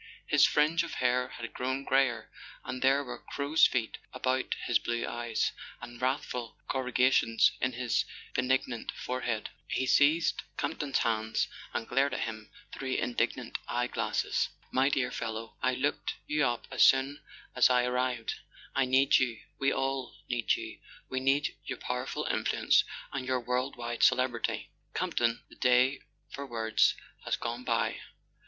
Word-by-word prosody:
His - - +5
fringe 155 +3 +3
of 170 - -5
hair 125 0 +2
had 115 -1 -8
grown 130 +2 -2
greyer, 130 -5 +1 0.3
and 125 - -4
there 135 +2 +4
were 130 - -7
crow's 145 +3 +3
feet 120 -4 -2
about 130 +1 0
his 120 - +3
blue 120 0 -2
eyes, 120 -1 -1 0.3
and 120 0 -10
wrathful 125 -3 -2
corrugations 125 -3 +3
in 130 -1 +1
his 125 0 +1 0.3
benignant 125 -2 0
forehead. 125 -3 -3 0.2
He 130 - 0
seized 150 +5 +4 0.2
Campton's 145 -4 -1
hands 110 -1 0 0.2
and 115 - -3
glared 135 +1 +2
at - - -3
him 110 -2 -5 0.2
through 130 -1 -3
indignant 120 - -1
eye 120 0 0
glasses. - - -1 0.2
"My 130 +2 +3
dear 130 -3 0
fellow, 110 0 -5
I 130 0 +2
looked 140 +3 -1
you 150 -3 +2
up 120 -1 -2
as - - -1
soon 135 +2 +5 0.3
as - - +6
I 125 -1 +4
ar¬ 125 - -1
rived. 125 -2 -1 0.4
I 135 - +3
need 135 +2 +5
you—we 130 +2 -1
all 135 -1 -2
need 120 -2 +1
you—we 130 - -7
need 140 +5 +1
your 130 - -5
pow¬ 125 +1 -3
erful - - -3
influence - - +3 0.3
and 135 -2 -3
your 130 -1 +1
world 125 +3 -1
wide 120 -1 -4
celebrity. 125 -2 +2 0.2
Camp - - -2
ton, 120 -1 +1
the - - -15
day 125 +2 +4 0.3
for 140 0 -6
words 110 -2 +2 0.3
has - - 0
gone 120 +1 -4
by. - - 0
125 Hz, 155 wpm, -30 LUFS, 120-135 Hz, 0.4 s, as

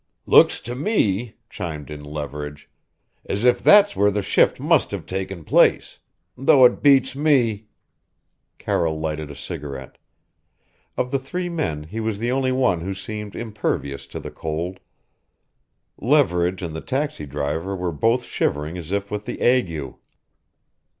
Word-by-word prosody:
"Looks - - +6
to 120 - -5
me," 120 - 0
chimed 75 - -6
in 75 -1 -8
Leverage, 75 0 -6 0.6
"as 100 +3 -2
if 125 0 +4
that's 205 0 +6
where 100 0 +4
the 105 0 -1
shift - - +3
must - - +2
have - - -5
taken 95 -2 -5
place; - - +3 0.4
though 130 0 +6
it 125 - +3
beats 135 -2 +4
me 120 -8 +2 0.5
" - - -51
Carroll 80 -2 -1
lighted 80 -1 -3
a 70 - -9
cigarette. 70 -2 -7 1.0
Of 125 - -1
the 135 - +1
three 175 +7 -4
men, 145 - -2
he 95 +9 -7
was 110 -2 -2
the 120 +3 -1
only 130 0 +1
one 125 -10 +1
who 95 +3 -4
seemed 105 +2 -7
impervious 70 -11 -3
to - - -7
the - - -8
cold. 85 +4 -4 1.2
Leverage 95 - +2
and 80 -2 -5
the 80 - -5
taxi 135 - -3
driver 75 +7 -3
were 90 -1 -2
both 115 - +1
shivering 75 -3 -2
as 85 0 -8
if 100 0 -2
with 105 0 -4
the - - -5
ague. 85 - +1
95 Hz, 150 wpm, -22 LUFS, 80-125 Hz, 1.2 s, Looks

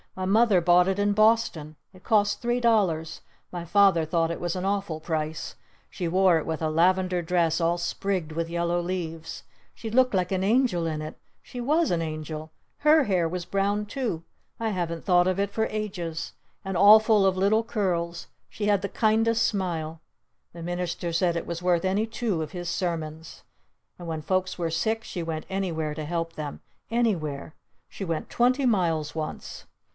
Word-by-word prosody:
"My 185 - -3
Mother 210 0 +4
bought 175 +1 +5
it 195 +1 -1
in 205 0 +2
Boston! 215 -8 +2 0.2
It 185 0 -17
cost 205 -2 +2
three 240 +1 0
dollars! 185 -9 +1 0.3
My 175 -1 -5
Father 190 -1 +4
thought 165 +1 0
it 170 - -5
was 175 0 -2
an 185 0 -3
awful 195 -5 -1
price! 155 -1 -3 0.3
She 175 - -4
wore 185 0 +4
it - - -6
with 160 -1 -3
a 160 - 0
lavender 180 +2 +2
dress 170 -1 +1
all 170 +1 +2
sprigged 175 -1 -2
with 165 +1 -3
yellow 170 0 0
leaves! 165 -3 -5 0.3
She 225 - -7
looked 255 +2 +3
like 185 -1 0
an 190 -1 0
angel 215 -5 +2
in 155 -1 -2
it! 155 - -8 0.2
She 245 - -8
was 305 +6 +2
an 170 -1 +1
angel! 155 0 -5 0.3
Her 300 0 +5
hair 180 -6 +1
was 175 0 -4
brown 200 +2 0
too! 210 -8 -3 0.4
I 225 -1 -1
haven't 170 -4 -3
thought 180 -2 +4
of 185 +1 0
it 200 0 0
for 220 +1 0
ages! 185 -7 -4 0.3
And 195 -1 -3
all 205 +4 +8
full 215 -2 +3
of 190 -1 +2
little 205 +4 +3
curls! 175 -6 -2 0.2
She 210 - -4
had 205 -2 +3
the 200 - -3
kindest 225 +1 +2
smile! 165 -5 -2 0.5
The 170 -1 -9
minister 175 -1 -3
said 170 0 +1
it - - -4
was 170 0 -4
worth 180 -1 +2
any 195 +4 +1
two 220 -6 -2
of 155 - -5
his 175 -2 -5
sermons! 160 -3 -4 0.6
And 175 - -8
when 160 -2 -4
folks 185 +2 -1
were 170 -2 -2
sick 220 +7 -1
she 175 -5 -5
went 160 -1 -4
anywhere 165 -6 -2
to 155 0 -5
help 165 +1 -3
them! 150 -3 -6 0.3
Anywhere! 170 -12 -1 0.3
She - - -8
went 165 -4 -3
twenty 255 +3 +2
miles 165 -9 +1
once! 155 -1 -6
180 Hz, 185 wpm, -26 LUFS, 165-205 Hz, 0.6 s, all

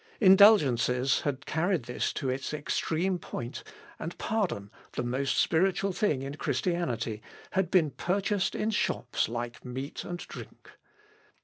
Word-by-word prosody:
Indulgences 145 - +5
had 140 -2 -3
carried 170 -1 0
this 125 +1 -2
to 135 - -3
its 130 +3 -2
extreme 170 +4 -1
point, 120 -5 -6 0.4
and 170 - -5
pardon, 175 - -2 0.2
the - - -2
most 130 +2 -1
spiritual 190 +3 +2
thing 165 - 0
in 135 +1 -5
Christianity, 120 - -1 0.3
had 190 -3 +1
been 170 -6 +3
purchased 195 +5 0
in 220 - 0
shops 205 - 0
like 120 0 -5
meat 130 +3 -5
and 175 - -5
drink. - - -11
155 Hz, 130 wpm, -29 LUFS, 125-190 Hz, 0.4 s, Indulgences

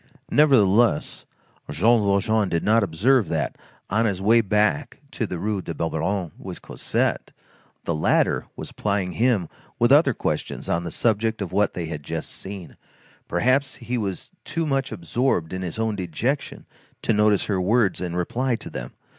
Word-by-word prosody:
Nevertheless, 120 - +3 0.4
Jean 115 +6 +3
Valjean 100 +1 +2
did 85 - -1
not 110 +2 +4
observe 100 +4 +2
that, - - -1 0.3
on 110 +3 +1
his 95 -3 -1
way 110 +4 +5
back 105 +7 0
to 115 - -2
the 90 - -4
Rue 100 +2 -2
de 85 - -6
Babylone 85 +3 -2
with - - -8
Cosette, - - -2 0.5
the 85 - -1
latter 75 - +1
was - - -7
plying 100 -3 -1
him 110 -5 +1 0.3
with 120 +2 +3
other 140 -4 +5
questions - - -3
on 85 +1 0
the - - -3
subject 110 +3 0
of 100 -4 -4
what 100 +2 +1
they 85 - -3
had 80 -2 -5
just 80 +2 -4
seen; 95 -2 -8 0.5
perhaps 130 +9 +1
he 120 +1 -4
was 100 -6 -4
too 165 - -2
much 135 -3 -1
absorbed 90 - -1
in 95 - -3
his 90 0 -5
own 110 -1 0
dejection 100 - -3 0.4
to - - +2
notice 105 -1 +3
her 95 -3 0
words 105 0 +2
and 90 -1 -3
reply 120 +8 0
to 115 - -9
them. - - -6
105 Hz, 165 wpm, -24 LUFS, 90-115 Hz, 0.5 s, way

